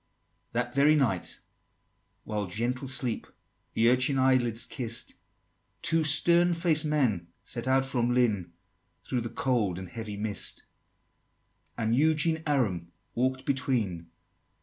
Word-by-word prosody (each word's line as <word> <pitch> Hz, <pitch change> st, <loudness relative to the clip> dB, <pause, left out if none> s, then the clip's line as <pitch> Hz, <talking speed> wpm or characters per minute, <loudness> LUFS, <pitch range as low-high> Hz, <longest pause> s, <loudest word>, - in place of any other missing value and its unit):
XXXVI. -, -, -45 dB
That 120 Hz, +1 st, -1 dB
very 145 Hz, +3 st, +5 dB
night, 115 Hz, -, 0 dB, 0.8 s
while 105 Hz, -2 st, -3 dB
gentle 120 Hz, +8 st, -3 dB
sleep 125 Hz, -3 st, -1 dB, 0.5 s
The 115 Hz, -, +3 dB
urchin 130 Hz, +3 st, +3 dB
eyelids 125 Hz, -3 st, +2 dB
kiss'd, 120 Hz, -1 st, -4 dB, 0.7 s
Two 165 Hz, 0 st, +4 dB
stern 170 Hz, +3 st, +4 dB
faced 165 Hz, -2 st, +2 dB
men 125 Hz, -, 0 dB, 0.2 s
set 120 Hz, +1 st, -4 dB
out 135 Hz, 0 st, +3 dB
from 125 Hz, -2 st, 0 dB
Lynn, 110 Hz, -8 st, +1 dB, 0.5 s
Through 125 Hz, -, -2 dB
the 115 Hz, -, -4 dB
cold 110 Hz, -10 st, 0 dB
and 95 Hz, 0 st, -7 dB
heavy 110 Hz, -3 st, -6 dB
mist; 105 Hz, -1 st, -2 dB, 1.1 s
And 115 Hz, 0 st, +1 dB
Eugene 160 Hz, +3 st, +2 dB
Aram 100 Hz, -, 0 dB, 0.2 s
walk'd 130 Hz, +2 st, -1 dB
between. 120 Hz, -, -1 dB
125 Hz, 125 wpm, -28 LUFS, 110-140 Hz, 1.1 s, very